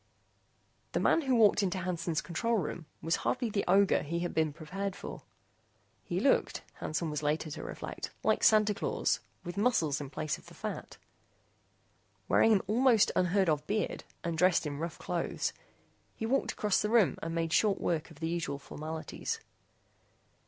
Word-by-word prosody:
The - - +1
man 330 - +3
who 265 -4 +1
walked 215 -2 +5
into 190 -2 0
Hansen's 170 -3 -1
control 230 +7 -1
room 170 -4 -3 0.2
was 165 +1 +1
hardly 245 -3 -1
the 200 -1 0
ogre 195 +2 +4
he 170 +3 -3
had 175 - -2
been 160 -1 +2
prepared 190 +6 -4
for. - - -7 0.8
He - - -2
looked, - - +2 0.2
Hansen 155 0 -2
was 150 - -2
later 150 +1 -1
to - - -6
reflect, - - -6
like - - +2
Santa 215 -1 +5
Claus - - 0 0.2
with 175 +1 -6
muscles 170 - +2
in 140 - -6
place 155 +1 -3
of - - -19
the - - -13
fat. - - -6 1.3
Wearing 225 - +5
an 205 -3 +5
almost 230 +1 +4
unheard 185 +1 +3
of 150 -2 0
beard 210 0 -1 0.2
and 170 -1 -1
dressed 180 0 +3
in 145 -1 -4
rough 165 +1 -4
clothes, - - -2 0.6
he 225 - -4
walked 265 +4 +1
across 210 -2 +1
the 210 - 0
room 225 -5 +4
and 165 +1 -3
made 165 -1 -1
short 205 +3 +3
work 165 -1 -1
of 160 - -15
the 160 - -2
usual 165 -4 -2
formalities. 155 +3 -5
175 Hz, 170 wpm, -31 LUFS, 160-210 Hz, 1.3 s, walked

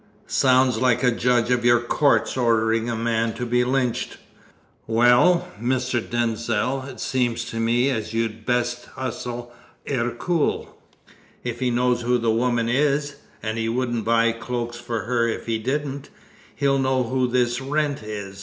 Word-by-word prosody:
Sounds 130 -3 +3
like 125 0 +2
a 125 - +4
judge 120 0 +1
of 120 -1 +2
your 120 0 +5
courts 120 -1 +1
ordering 115 -2 +1
a 115 - -1
man 115 0 0
to 125 - -3
be 125 +1 +2
lynched. 125 -1 -1 0.7
Well, 120 +10 +4
Mr. 125 0 0
Denzil, 120 +2 -1
it 130 - -10
seems 120 -3 -1
to 115 - -4
me 120 +4 +2
as 110 -5 -3
you'd 115 -1 -2
best 120 0 -1
hustle 120 -1 -5 0.3
Ercole. 135 +6 -1 0.7
If 120 -1 -4
he 125 - +1
knows 125 0 +1
who 125 +1 +2
the 115 -1 +1
woman 120 0 +1
is 140 +2 +1 0.3
and 110 +1 -2
he 115 0 -1
wouldn't 120 -1 -1
buy 115 +1 +3
cloaks 120 0 -4
for 120 -2 -4
her 115 +2 0
if 115 - -3
he 115 -1 -1
didn't 140 +3 -3 0.5
he'll 140 0 +1
know 130 -1 +1
who 130 +1 0
this 120 0 0
Wrent 145 0 -1
is. 100 -2 -7
120 Hz, 155 wpm, -23 LUFS, 115-130 Hz, 0.7 s, your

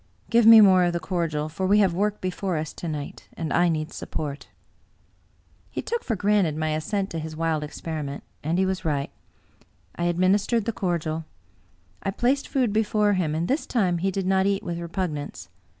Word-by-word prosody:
Give 230 -1 +5
me 225 -1 +11
more 185 -3 +6
of 175 - 0
the 170 - -1
cordial, 165 -4 -2
for 185 +4 -3
we 205 +2 +5
have 195 -4 +4
work 205 +3 -1
before 185 -1 -2
us 155 0 -4
to 170 - -6
night, 150 -3 -6
and 160 -2 -3
I 175 0 +4
need 155 -1 -2
support." 145 -2 -5 1.2
He - - -5
took 470 0 -2
for 225 - -1
granted 200 -6 +2
my 155 0 -1
assent 190 +6 -2
to 165 - -3
his 155 0 -6
wild 160 -1 0
experiment; 150 -2 -5 0.2
and 160 +4 0
he 190 - +3
was 190 -1 -2
right. 145 -4 -1 0.8
I 170 - -2
administered 195 +6 +2
the 230 - -1
cordial. 165 -4 -2 0.8
I - - -2
placed 250 +7 0
food 250 -6 0
before 210 -1 +2
him, 165 -5 0
and 165 +2 -1
this 285 +4 -1
time 185 -8 +1
he 195 +3 +1
did 195 0 -2
not 190 +1 +2
eat 200 -1 0
with 170 -1 -4
repugnance. 160 - -4
180 Hz, 190 wpm, -25 LUFS, 155-200 Hz, 1.2 s, me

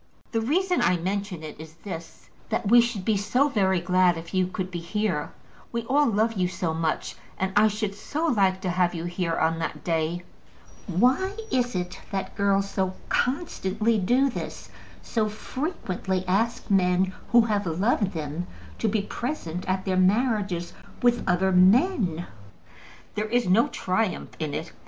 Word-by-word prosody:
"The 225 - 0
reason 360 +9 +1
I 180 - +3
mention 190 -1 -3
it 155 -1 -8
is 160 0 -10
this, 170 -5 -8 0.2
that 210 - -1
we 240 +3 +8
should 230 -5 -2
be 215 -2 +2
so 245 +9 +2
very 190 -7 +2
glad 180 0 +3
if 165 +2 -9
you 185 -1 +2
could 185 0 -4
be 175 - -3
here. 170 -3 -2 0.4
We 235 0 -2
all 285 +5 +3
love 225 +1 +2
you 185 -4 +1
so 175 -2 -2
much, 160 -1 -1 0.2
and 190 0 -1
I 210 +1 +6
should 210 -1 -2
so 290 +10 -3
like 195 - +2
to 185 - -1
have 180 0 +1
you 165 - -4
here 175 -1 -1
on 165 +1 +1
that 165 - -4
day." 165 +1 -1 0.6
Why 255 - +2
is 245 -3 +1
it 180 0 -3
that 195 -1 -3
girls 200 0 +2
so 190 -1 -1
constantly 230 - 0
do 255 +8 +3
this, - - -7 0.3
so 220 -2 0
frequently 195 - -3
ask 215 +4 0
men 185 0 +3 0.2
who 240 - +7
have 210 -4 0
loved 195 +4 +1
them 160 +2 -4 0.3
to 225 - +1
be 210 -1 +1
present 200 - -4
at 185 0 0
their 185 -1 0
marriages 200 -3 +1 0.3
with 240 -1 +3
other 185 +2 +2
men? 185 - +4 0.9
There 215 +1 -2
is 240 -1 +1
no 210 +6 +4
triumph 185 +2 -1
in 155 -3 -2
it. - - -5
195 Hz, 165 wpm, -26 LUFS, 180-225 Hz, 0.9 s, we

